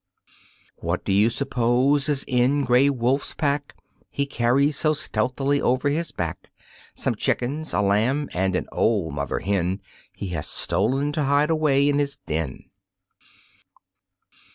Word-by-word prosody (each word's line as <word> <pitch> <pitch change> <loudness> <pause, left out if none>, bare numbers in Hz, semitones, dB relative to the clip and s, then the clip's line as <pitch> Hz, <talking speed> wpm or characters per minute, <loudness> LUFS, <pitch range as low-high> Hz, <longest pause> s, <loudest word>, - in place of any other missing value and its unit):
What - - -3
do - - +1
you 105 +3 +4
suppose 135 +3 +1
is 140 -2 0
in 130 +3 +2
Gray 125 +2 +4
Wolf's 130 +1 0
pack 145 -1 -1 0.3
He 140 - -1
carries 140 +3 +1
so 155 +2 +2
stealthily 140 -1 -1
over 130 +3 +1
his 160 +2 -1
back? 85 -2 -5 0.5
Some - - -1
chickens, 145 +6 -1
a 100 - +1
lamb 115 +9 +1
and 95 +1 0
an - - -2
old 100 -9 +1
mother 70 0 -2
hen 95 -1 -1 0.3
He 100 - -6
has 80 -4 -3
stolen 135 +8 0
to 150 -1 -1
hide 145 +3 +2
away 145 -3 +3
in 145 0 +2
his 140 -1 -1
den. 75 -4 -3
130 Hz, 140 wpm, -24 LUFS, 105-145 Hz, 0.5 s, you